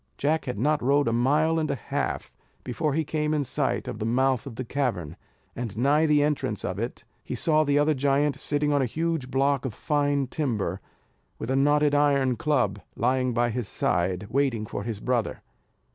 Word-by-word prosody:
Jack 155 +3 0
had 125 - -4
not 150 +7 +1
rode 140 +2 +2
a 115 - +1
mile 150 +7 +2
and 155 - -1
a - - 0
half, - - -3 0.3
before 140 +4 -1
he 160 - +1
came 150 +1 -1
in 145 - +1
sight 130 - -1
of 105 - -5
the - - -2
mouth 130 +1 +1
of 125 - -8
the 130 - -5
cavern; 105 - -2 0.4
and 115 -4 -5
nigh 145 +6 +3
the 150 -1 +4
entrance 150 -1 -1
of - - -3
it, - - -5 0.2
he - - -5
saw 155 -1 +3
the 145 -1 +2
other 150 +1 +3
giant 140 +1 +1
sitting 145 0 +1
on 145 - +3
a - - +2
huge 160 0 -2
block 135 0 +1
of 120 -6 -4
fine 145 -2 +1
timber, 115 - -2 0.6
with 115 - -4
a - - +2
knotted 145 +1 +3
iron 140 -3 +3
club 120 -7 0
lying 130 +2 +1
by 120 0 +1
his 120 -2 -3
side, 90 +2 0
waiting 130 -5 +1
for 100 - -5
his 110 -1 -4
brother. 120 0 -1
135 Hz, 195 wpm, -26 LUFS, 120-150 Hz, 0.6 s, the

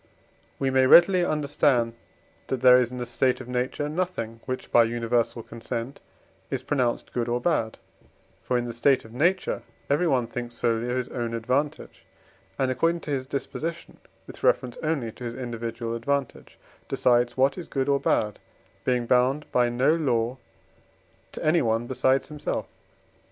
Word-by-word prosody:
We 135 -1 0
may 130 0 +4
readily 180 +4 +7
understand 140 -6 +1 0.5
that 130 -2 -2
there 125 -1 +8
is 125 -1 +3
in 125 - -6
the 125 - -3
state 125 +2 +1
of 130 - -9
nature 125 +4 -2
nothing, 150 -9 -3
which 130 0 -4
by 120 -1 +6
universal 115 0 -1
consent 115 +3 -6 0.5
is - - -3
pronounced 125 -5 -1
good 120 -1 -1
or 120 +1 0
bad; 120 -6 0 0.6
for 125 - 0
in 120 - -1
the 120 - -5
state 130 +2 +2
of 110 - -13
nature 175 +9 +1 0.3
everyone 140 -5 +2
thinks 120 0 -6
solely 115 0 0
of 125 - -1
his 125 -1 -3
own 120 -2 -3
advantage, 130 +6 -2 0.5
and 130 -1 +1
according 165 +6 +1
to 150 - -6
his 130 -2 -2
disposition, 145 +4 -5 0.3
with - - -12
reference 125 -2 +2
only 155 -8 -1
to 125 - -12
his 120 -1 -4
individual 115 -2 -4
advantage, 140 +2 -3 0.3
decides 120 0 +2
what 135 +2 +3
is 180 - -7
good 135 -1 -1
or 140 -1 +3
bad, 105 -5 0 0.4
being 125 -2 +1
bound 130 +4 +2
by 120 -1 +3
no 125 +6 +3
law 125 -6 0 0.9
to - - -7
anyone 120 -8 +2
besides 130 +1 +1
himself. 150 -1 -3
125 Hz, 160 wpm, -26 LUFS, 120-140 Hz, 0.9 s, there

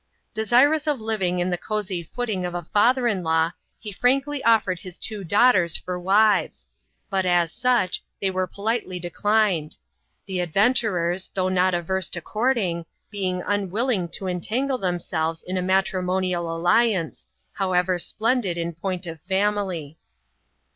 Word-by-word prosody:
Desirous 260 +8 +3
of 295 -2 +1
Kving 210 -6 -1
on 180 +1 0
the 175 - -1
cozy 205 -5 -3
footing 200 +2 -3
of 175 0 -4
a 175 -2 -4
father 245 +4 +4
in 205 -5 0
law, 160 0 +1 0.3
he 210 - -8
frankly 270 +6 +1
offered 215 -6 +3
his 185 -1 -9
two 215 -3 -3
daughters 185 -2 +4
for 180 0 -5
wives; 195 - +2 0.4
but, 190 -1 +1
as 175 -2 +2
such, 240 -6 +1 0.2
they 195 -1 0
were 185 0 -1
politely 200 -2 -2
declined; 180 -2 0 0.5
the 190 -1 -3
adventurers, 185 -1 +1
though 185 -1 +1
not 185 0 +2
averse 185 +2 -1
to 175 - 0
courting, 210 -3 -1 0.3
being 185 -3 -2
unwilling 205 0 0
to 190 - -4
entangle 235 +9 -1
themselves 165 -3 -2
in 185 - -3
a 185 - 0
matrimo 185 0 +1
nial 175 -2 -1
alliance, 175 +1 +1 0.3
however 185 -2 +1
splendid 220 -2 0
in 170 0 -3
point 180 +2 -4
of 165 -2 -8
family. 190 -5 -1
185 Hz, 145 wpm, -24 LUFS, 175-215 Hz, 0.5 s, father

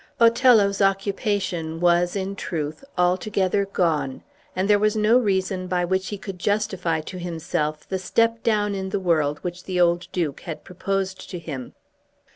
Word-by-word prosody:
Othello's 230 -4 +5
occupation 195 -4 0
was, 175 +1 +3
in 195 0 -2
truth, 155 - -4
altogether 185 +2 +1
gone, 155 -8 0 0.3
and 185 +1 0
there 205 -1 +5
was 215 +1 +2
no 215 +3 +4
reason 190 -4 0
by 180 -1 0
which 190 +1 0
he 205 - -4
could 195 -2 -8
justify 190 -5 0
to 180 +4 -8
himself 160 -3 -3
the 190 - -2
step 230 +4 +1
down 210 -2 +1
in 190 -1 -3
the 200 - -1
world 155 -5 +1
which 180 0 -5
the 185 -1 -2
old 175 0 +3
Duke 160 -6 -2
had 160 -3 -7
proposed 190 +1 -3
to 180 - -5
him. 145 -7 -7
185 Hz, 160 wpm, -24 LUFS, 170-200 Hz, 0.3 s, Othello's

